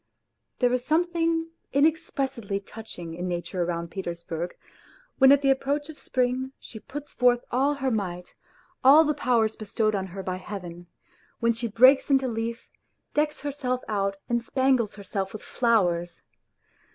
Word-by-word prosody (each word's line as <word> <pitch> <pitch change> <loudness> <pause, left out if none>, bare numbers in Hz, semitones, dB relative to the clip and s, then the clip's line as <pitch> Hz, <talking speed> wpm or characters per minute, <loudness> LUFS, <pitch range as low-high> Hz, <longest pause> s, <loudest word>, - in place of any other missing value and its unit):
There 245 -1 +2
is 250 -1 0
something 330 +1 +1 0.2
inexpressibly 275 - 0
touching 195 -5 -9
in 175 +2 -4
nature 175 +1 -2
round 170 -1 -3
Petersburg, 170 -2 -5 0.6
when 265 0 +8
at 285 0 +5
the 275 - +5
approach 285 +3 -1
of 310 - -10
spring 255 +1 -1
she 220 - -10
puts 290 +5 -8
forth 245 -1 +3
all 275 +4 +2
her 265 -2 -1
might, 180 -5 -3 0.5
all 285 +5 +8
the 300 -1 +1
powers 235 -6 +1
bestowed 215 0 -1
on 190 -2 -2
her 190 +1 -7
by 185 0 -3
Heaven, 175 -3 -8 0.5
when 235 -1 +3
she 235 +1 -3
breaks 255 +7 +5
into 270 -1 +3
leaf, 230 0 -4 0.5
decks 300 0 0
herself 265 -3 -2
out 195 -2 0
and 235 0 +1
spangles 260 -2 +1
herself 195 -1 -4
with 215 - -8
flowers. 175 -8 +1
235 Hz, 150 wpm, -26 LUFS, 195-270 Hz, 0.6 s, when